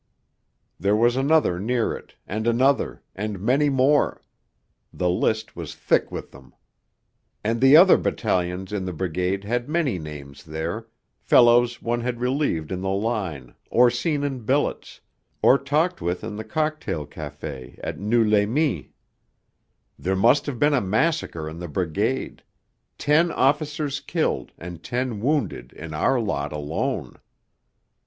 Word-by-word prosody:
There 100 +3 +2
was 120 +2 +3
another 135 - +2
near 115 +3 0
it, - - -13
and 110 +3 -3
another, 130 +4 +2
and 105 0 -4
many 135 +9 +2
more; 135 +2 +2 0.7
the 90 -1 0
list 110 +4 -1
was - - -7
thick - - +1
with - - -6
them. 65 0 -16 0.9
And 115 +2 -1
the 135 +3 +8
other 185 +2 +8
battalions 95 -2 -1
in 95 -3 -2
the 90 - -4
Brigade 90 +3 -2
had 120 +5 -2
many 155 - 0
names 75 -1 -9
there 85 +7 -4 0.3
fellows 120 0 +4
one 120 +1 -1
had 120 0 -3
relieved 125 - -1
in 90 -1 -3
the 95 - -2
line, 95 - -2 0.2
or 120 0 +5
seen 145 +4 -1
in 135 -3 -2
billets, 130 +6 -1 0.4
or 135 - +6
talked 155 +6 0
with 90 +3 -2
in 110 -1 -5
the 110 - -5
Cocktail 155 - -2
Café 75 -4 -8
at - - -4
Noeux 110 +2 +2
les 105 -1 +3
Mines. 125 - 0 1.1
There 95 +1 0
must 120 +10 +3
have 140 -4 -3
been 145 +4 +3
a 135 - +3
massacre 105 - 0
in 80 +2 -7
the 90 - -5
Brigade... 95 - -2 0.6
ten 160 +4 +3
officers 145 +1 0
killed 155 +3 -2
and 85 -1 -8
ten 125 -1 -2
wounded 135 - -1
in 80 -1 -8
our 125 +12 +2
lot 75 -10 -2
alone. 75 +1 -3
115 Hz, 145 wpm, -24 LUFS, 90-135 Hz, 1.1 s, the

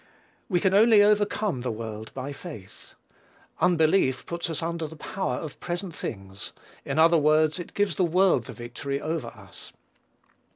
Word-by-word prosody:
We 180 -3 +2
can 190 +2 +2
only 215 0 +7
overcome 205 - +2
the 125 - -2
world 110 -1 -6
by 135 +2 -4
faith. 135 - -10 0.6
Unbelief 160 -5 +3
puts 170 0 -3
us 165 0 -3
under 165 -1 -2
the 160 - -11
power 155 -3 -3
of 150 +2 -7
present 175 0 -4
things; 95 -6 -6 0.3
in 135 - -3
other 165 +1 +6
words, 155 +2 +3
it 175 - -8
gives 205 -5 +1
the 185 - +3
world 175 - +3
the - - -8
victory 125 +4 -4
over 155 -4 -3
us. 95 -5 -10
160 Hz, 160 wpm, -26 LUFS, 130-180 Hz, 0.6 s, only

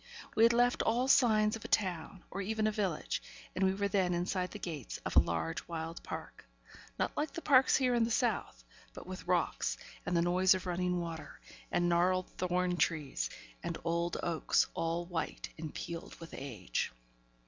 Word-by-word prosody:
We - - +3
had 230 +1 +8
left 245 +1 +3
all 245 +3 +2
signs 215 -5 +5
of 225 - -8
a - - -5
town, 185 -2 -1
or 195 - -3
even 215 +2 0
a 215 - +3
village, 195 -7 -1 0.3
and 190 +1 +2
were 200 - +2
then 185 -3 +2
inside 180 +1 -1
the - - -7
gates 155 -8 -5
of - - -3
a - - +10
large 80 -1 -1
wild 165 0 -5
park - - -7 0.5
not - - -1
like 300 0 -1
the 335 - -5
parks 265 -2 +6
here 255 -2 +2
in 235 -1 +3
the 225 - +1
south, 220 - 0 0.3
but - - -8
with - - -8
rocks, - - +1 0.3
and 180 - 0
the 170 - +4
noise 185 +2 +4
of 185 +1 -4
running 180 0 0
water, 165 -2 -6 0.3
and 175 - +2
gnarled 180 +2 +2
thorn 180 0 0
trees, 155 -4 0 0.3
and - - -3
old 170 +1 0
oaks, 170 -2 +2
all 165 +1 -1
white 175 -2 -3
and 155 -1 -5
peeled 170 -1 -6
with 165 -1 -11
age. 110 - -3
180 Hz, 180 wpm, -33 LUFS, 165-210 Hz, 0.5 s, a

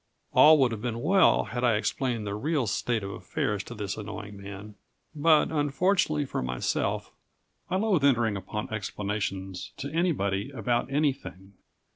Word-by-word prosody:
All 155 +1 +8
would 130 -4 +3
have 110 -2 -5
been 120 -1 -3
well 190 +4 +5
had 125 0 -4
I 120 -3 +4
explained 115 +1 -1
the 100 - -3
real 140 +5 0
state 110 +2 -1
of 100 - -4
affairs 100 +2 -2
to 120 - -8
this 100 -2 -4
annoying 105 -1 -7
man; 100 +1 -9 0.4
but, 155 +1 +4
unfortunately 155 +1 +1
for - - -3
myself, 60 0 -2 0.6
I 180 - 0
loathe 190 -6 +2
entering 120 -6 +3
upon 105 +2 -5
explanations 100 -2 -4
to 140 0 -5
anybody 125 - 0
about 120 0 -1
anything. 135 -9 -2
115 Hz, 150 wpm, -27 LUFS, 100-145 Hz, 0.6 s, All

